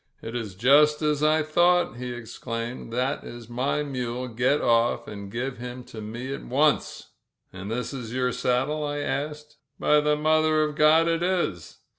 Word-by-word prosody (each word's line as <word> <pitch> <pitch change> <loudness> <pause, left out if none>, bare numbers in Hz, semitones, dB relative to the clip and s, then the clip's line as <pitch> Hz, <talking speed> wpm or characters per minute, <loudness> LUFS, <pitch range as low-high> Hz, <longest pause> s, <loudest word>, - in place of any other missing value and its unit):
"It 115 +1 -6
is 110 -6 -4
just 150 +8 +4
as 150 -1 +1
I 155 +1 +3
thought," 175 -2 +2
he 125 0 -5
exclaimed. 115 0 -6
"That 130 +4 -1
is 120 -1 -9
my 130 +5 -1
mule! 125 -3 -4
Get 125 +5 +1
off 115 0 +2
and 100 -1 -8
give 125 +2 -4
him 125 +1 -7
to 110 -2 -10
me 120 +5 -5
at - - -7
once 145 +3 0 0.2
!" - - -47
"And 95 +3 -7
is 125 +1 -3
this 125 -5 -6
your 125 0 0
saddle?*' 130 +6 0
I 145 0 -2
asked. 150 +1 -4 0.2
"By 150 - +4
the 150 0 +2
Mother 155 0 +3
of 150 0 -2
God, 155 +2 +5
it 165 0 +1
is!" 175 - -1
130 Hz, 180 wpm, -25 LUFS, 120-150 Hz, 0.2 s, God